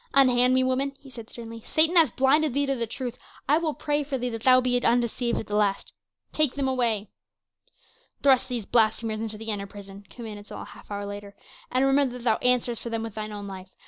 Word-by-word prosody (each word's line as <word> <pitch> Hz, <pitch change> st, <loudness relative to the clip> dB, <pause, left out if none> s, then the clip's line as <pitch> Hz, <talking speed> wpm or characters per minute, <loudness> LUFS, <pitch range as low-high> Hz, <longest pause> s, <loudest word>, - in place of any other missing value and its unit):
"Unhand 255 Hz, -2 st, +5 dB
me, 260 Hz, -, +4 dB
woman," 265 Hz, +2 st, 0 dB
he 275 Hz, -2 st, -15 dB
said 230 Hz, -3 st, -10 dB
sternly. 230 Hz, -1 st, -9 dB
"Satan 320 Hz, +3 st, +3 dB
hath 320 Hz, -8 st, +5 dB
blinded 270 Hz, +1 st, +3 dB
thee 285 Hz, 0 st, +2 dB
to 275 Hz, -, 0 dB
the 235 Hz, -2 st, -2 dB
truth; 250 Hz, +1 st, -5 dB, 0.3 s
I 295 Hz, +4 st, +4 dB
will 315 Hz, -3 st, -2 dB
pray 295 Hz, 0 st, -1 dB
for 275 Hz, -1 st, -3 dB
thee 250 Hz, 0 st, -2 dB
that 225 Hz, -1 st, -5 dB
thou 255 Hz, +1 st, +6 dB
be 245 Hz, -1 st, +1 dB
undeceived 240 Hz, 0 st, +1 dB
at -, -, -3 dB
the 205 Hz, -, -7 dB
last. 205 Hz, -2 st, 0 dB, 0.4 s
Take 305 Hz, -4 st, +2 dB
them 275 Hz, -1 st, 0 dB
away." 235 Hz, -5 st, 0 dB, 1.1 s
"Thrust 265 Hz, -3 st, +4 dB
these 240 Hz, -4 st, -3 dB
blasphemers 220 Hz, -1 st, +1 dB
into 220 Hz, -1 st, -4 dB
the 225 Hz, +1 st, -4 dB
inner 200 Hz, -1 st, -4 dB
prison," 200 Hz, 0 st, -12 dB
commanded 210 Hz, +1 st, -9 dB
Saul -, -, -7 dB
a -, -, -10 dB
half -, -, -15 dB
hour 205 Hz, 0 st, -4 dB
later, 205 Hz, 0 st, -8 dB, 0.4 s
"and 255 Hz, +2 st, +2 dB
remember 270 Hz, -2 st, +2 dB
that 240 Hz, -, -11 dB
thou 225 Hz, -3 st, +3 dB
answerest 250 Hz, -2 st, +1 dB
for 235 Hz, -, -5 dB
them 225 Hz, -1 st, -2 dB
with 225 Hz, -2 st, -6 dB
thine 215 Hz, 0 st, -5 dB
own 205 Hz, -1 st, -6 dB
life. 190 Hz, -1 st, -8 dB
240 Hz, 225 wpm, -26 LUFS, 215-265 Hz, 1.1 s, thou